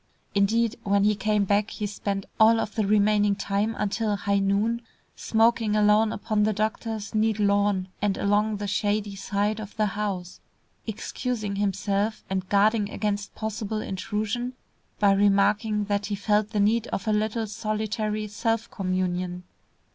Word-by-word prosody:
Indeed, 225 +4 +2
when 200 0 +2
he 210 +1 +4
came 210 0 +1
back 205 +2 +1
he 210 - -4
spent 200 -1 -3
all 225 +1 +6
of 210 - -3
the 215 -3 0
remaining 205 0 +3
time 205 +3 -1
until 210 +1 0
high 200 +1 0
noon, 205 +4 +1 0.3
smoking 225 -1 +2
alone 210 +1 +4
upon 210 0 -1
the 215 +1 +2
doctor's 215 +1 -3
neat 215 0 +2
lawn 200 -2 +2
and 200 -2 +1
along 210 +1 +1
the 205 - -4
shady 205 +1 -1
side 205 +2 -1
of 210 -1 -9
the 215 - +2
house, 195 -3 -3 0.5
excusing 215 -1 -3
himself 200 +1 -1
and 190 -1 -2
guarding 205 +1 +3
against 205 -1 -3
possible 220 0 -3
intrusion, 215 +5 -3 0.4
by 205 -2 +4
remarking 205 +2 +3
that 200 0 -1
he 205 - -2
felt 210 +1 +1
the 215 -2 -2
need 220 +3 +2
of 195 - -4
a 215 - +3
little 215 +2 0
solitary 215 0 -2
self 225 +2 -2
communion. 185 -1 -2
210 Hz, 150 wpm, -26 LUFS, 200-215 Hz, 0.5 s, all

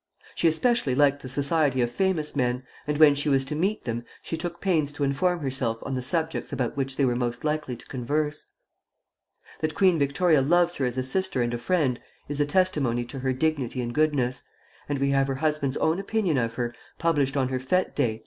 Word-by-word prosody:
She 170 - +2
especially 160 - +2
liked 145 0 +3
the 130 - -7
society 140 0 +1
of 120 -1 +1
famous 170 -1 0
men, 125 -1 0 0.2
and 150 0 0
when 155 -2 +7
she 145 +1 -1
was 135 -1 +2
to 135 - -4
meet 195 +7 0
them, 120 0 -3 0.2
she - - -3
took 170 +1 -5
pains 160 -7 +1
to 145 - -3
inform 165 +6 +1
herself 130 -4 -1
on 135 - -3
the 130 - -1
subjects 160 +5 -2
about 125 -3 -2
which 135 -1 -2
they 140 - +2
were 125 -1 +1
most 120 -1 -2
likely 150 -4 -1
to 120 - -15
converse. 150 +4 -2 1.1
That 155 -1 -2
Queen 185 -4 +4
Victoria 145 +2 +3
loves 175 +5 +2
her 130 - +1
as 125 +1 -4
a 130 - 0
sister 160 -1 0
and 120 0 -2
a 120 - -2
friend, 130 -1 +1 0.3
is 145 0 -1
a 145 - +2
testimony 145 -9 +1
to 135 +3 -7
her 130 0 0
dignity 135 -2 -1
and 120 -1 -3
goodness; 135 -4 +1 0.5
and 145 - 0
we 140 +1 +1
have 135 0 +2
her 135 - -1
husband's 150 -2 0
own 160 +3 +1
opinion 195 -7 0
of 115 -1 -2
her, 120 -1 -2 0.2
published 145 -4 +1
on 130 -2 +1
her 130 -1 -1
fête 180 +9 0
day, 120 -6 +1
Dec. - - -14
140 Hz, 215 wpm, -26 LUFS, 130-160 Hz, 1.1 s, when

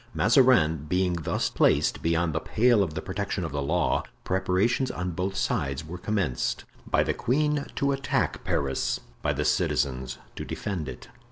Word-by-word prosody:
Mazarin 105 - +4
being 90 0 +2
thus 85 -3 -1
placed - - +2
beyond 85 -1 +1
the 80 - 0
pale 115 +4 +3
of 80 -6 -1
the - - -4
protection 95 -1 -3
of 80 - -5
the 70 0 -2
law, 70 - +1 0.2
preparations 95 +8 +1
on 90 0 -3
both 95 +3 -2
sides 70 -3 -1
were 90 +3 -7
commenced—by 95 - -1
the - - 0
queen, 150 +3 0
to 140 0 +1
attack 135 -2 -1
Paris, 70 -1 0 0.2
by - - +1
the - - -1
citizens, 65 -2 0 0.2
to - - -5
defend 90 -8 -4
it. - - -10
90 Hz, 160 wpm, -27 LUFS, 80-110 Hz, 0.2 s, Mazarin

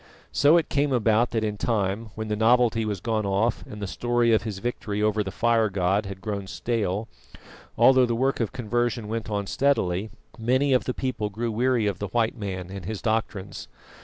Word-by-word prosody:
So 145 +4 +5
it 165 - +1
came 145 0 +1
about 115 -1 +3
that 115 -1 -1
in 105 -1 -2
time, 105 0 -1
when 110 0 -4
the 105 - -1
novelty 115 0 +3
was 105 -3 -2
gone 110 +1 -1
off 100 +4 0
and 105 - -9
the 100 - -3
story 120 +3 +1
of 110 - +4
his 110 -4 -5
victory 105 -2 -3
over 105 0 +1
the 95 - -5
Fire 115 +1 +2
god 95 +2 0
had 95 -1 -8
grown 100 -2 -4
stale, 105 +2 -2 0.7
although 130 -1 +6
the 120 - 0
work 135 +3 0
of 115 -4 -1
conversion 120 -2 -1
went 115 +1 -4
on 100 -1 -1
steadily, 105 -6 +1 0.3
many 130 +4 +2
of 125 - +2
the 125 - -2
people 120 -5 -2
grew 115 +3 -3
weary 120 0 +1
of 100 -3 -1
the 100 - -3
white 115 +2 0
man 95 -4 -5
and 95 -3 -7
his 110 +1 -4
doctrines. 110 -3 -2
110 Hz, 200 wpm, -25 LUFS, 100-120 Hz, 0.7 s, although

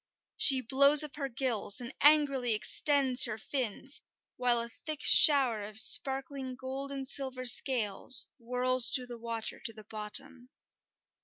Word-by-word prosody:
She 265 -3 +4
blows 280 +4 +2
up 300 0 -11
her 275 -2 -7
gills 235 -4 -5
and 240 0 -11
angrily 275 -6 +1
extends 270 +3 +3
her 220 -3 -8
fins, 260 +2 -5 0.3
while 245 -1 -2
a 235 - -7
thick 305 +5 -10
shower 265 -9 +4
of 210 +1 -1
sparkling 265 +1 +3
gold 265 +2 -10
and 270 -1 -8
silver 260 -2 -3
scales 245 0 +3
whirls 250 +1 +2
through 255 -2 -4
the 240 -1 -13
water 230 -1 -8
to 230 -3 -6
the 215 0 -16
bottom. 235 +4 -8
255 Hz, 145 wpm, -27 LUFS, 235-275 Hz, 0.3 s, She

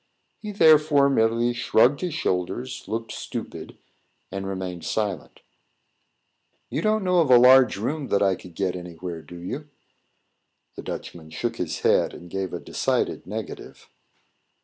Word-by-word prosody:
He, 210 - -6
therefore, 150 -6 +5
merely 115 0 +2
shrugged 125 +3 +3
his 175 -4 -2
shoulders, 120 - -2
looked 115 +2 -4
stupid, - - -7 0.5
and 95 0 -4
remained 95 -3 -5
silent. 95 -4 -3 1.3
"You - - -1
don't 215 -1 +1
know 180 -1 +3
of 155 - +1
a 125 - +8
large 130 0 +6
room 135 +7 -3
that 100 - +2
I 95 -1 +3
could 90 -2 -11
get 95 -2 -1
anywhere, 90 -1 -7
do 90 - -12
you?" 145 - -6 1.1
The - - -7
Dutchman 80 -2 -7
shook 115 +7 -3
his 90 -3 -3
head, - - +2
and 85 -1 -12
gave 95 -2 -3
a - - -4
decided - - -1
negative. - - -7
115 Hz, 145 wpm, -24 LUFS, 90-140 Hz, 1.3 s, a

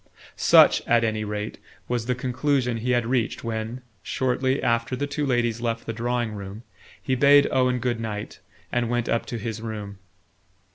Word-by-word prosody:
Such, - - +6
at 120 -1 +4
any 110 -1 0
rate, 105 0 -4 0.3
was 120 -2 -2
the 125 - +1
conclusion 125 -1 0
he 120 +3 -3
had 120 -2 +2
reached 120 -1 -1
when, 115 +2 -4 0.2
shortly 130 +4 0
after 115 +1 +1
the 145 - -2
two 145 0 -2
ladies 120 -2 0
left 115 -1 -2
the 115 - -3
drawing 120 0 -1
room, 100 +1 -8 0.4
he 130 - -2
bade 140 +2 +6
Owen 125 -1 +2
good 120 -1 -1
night 105 -2 -5 0.3
and 120 -1 0
went 120 -1 0
up 115 - 0
to 120 - -4
his 110 0 -5
room. 105 -3 -6
120 Hz, 175 wpm, -25 LUFS, 110-125 Hz, 0.4 s, Such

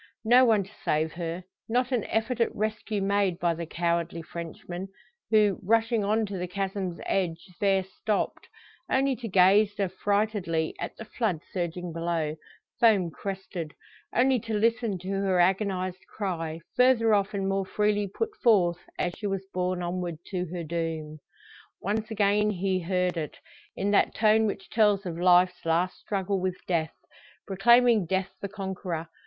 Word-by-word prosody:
No 245 +3 +7
one 220 -4 +4
to 195 - -15
save 155 +1 +1
her 170 +1 -4 0.3
not 250 +2 +1
an 245 -5 0
effort 230 +2 -1
at 230 - +1
rescue 215 -1 -2
made 200 -3 +1
by 170 -1 +1
the 165 0 -6
cowardly 170 0 -1
Frenchman; 175 +3 -7 0.4
who, 210 -3 +4
rushing 225 +2 +2
on 215 +2 +1
to 200 -2 -5
the 180 - -3
chasm's 190 -1 -3
edge, 170 -4 -1
there 195 -2 +3
stopped, 200 +2 -3 0.4
only 270 0 +2
to 235 - -6
gaze 200 +2 +5
affrightedly 195 -3 0
at - - -5
the 225 - -8
flood 210 -7 -1
surging 175 -1 -3
below, 165 -2 -1 0.4
foam 205 -7 +4
crested; 185 -4 -6 0.4
only 255 +1 +3
to 225 0 -4
listen 225 -1 +1
to 180 +1 -10
her 195 -2 +1
agonised 185 0 +1
cry, 165 -5 -4
further 250 -3 +4
off 205 0 +1
and 195 -1 -1
more 195 0 +1
freely 210 0 +1
put 435 - -3
forth, 180 -7 +4 0.2
as 175 - -1
she 210 - -4
was 195 -1 -2
borne 180 0 -1
onward 175 -1 -3
to 180 -2 -3
her 175 +1 -5
doom. 160 -1 -4 0.6
Once 215 +3 -2
again 210 -1 +2
he 190 -1 0
heard 180 0 0
it, 155 -2 -4 0.4
in 200 +1 0
that 205 - +3
tone 220 0 +4
which 195 -1 -4
tells 210 -3 +3
of 170 -2 -4
life's 180 0 +4
last 170 +3 0
struggle 195 -1 -1
with 185 0 -1
death 165 -3 0 0.5
proclaiming 230 0 +4
death 190 +1 -1
the 200 - -4
conqueror. 190 -4 -4
195 Hz, 160 wpm, -27 LUFS, 175-210 Hz, 0.6 s, No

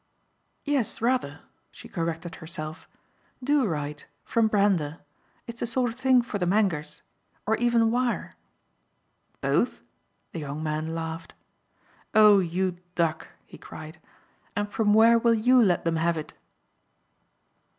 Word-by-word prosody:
"Yes, 275 -7 0
rather" 230 - -1 0.3
she - - -13
corrected 165 0 -4
herself. 155 -1 -7 0.6
"Do 280 -2 +2
write 150 -3 -4 0.2
from 230 -1 +2
Brander. 195 -8 +1 0.5
It's 235 0 -9
the - - -2
sort 245 0 0
of - - -11
thing 260 -2 +4
for 215 -3 -4
the 180 - 0
Mangers. 185 -6 0 0.4
Or 220 +2 +2
even 235 -1 +2
wire." 245 0 -1 1.1
"Both?" - - 0 0.5
the 165 - -5
young 145 +1 -5
man 155 +1 -2
laughed. 165 0 -6 0.8
"Oh 210 -2 +7
you 180 0 -1 0.2
duck!" 160 -2 0 0.2
he - - -14
cried. 155 +1 -10 0.6
"And 205 0 -2
from 210 -1 +2
where 230 +1 +6
will 230 0 +3
YOU 250 +3 +4
let 185 -7 +2
them 165 -1 +1
have 165 +1 +1
it?" 155 - -6
195 Hz, 130 wpm, -26 LUFS, 160-230 Hz, 1.1 s, Oh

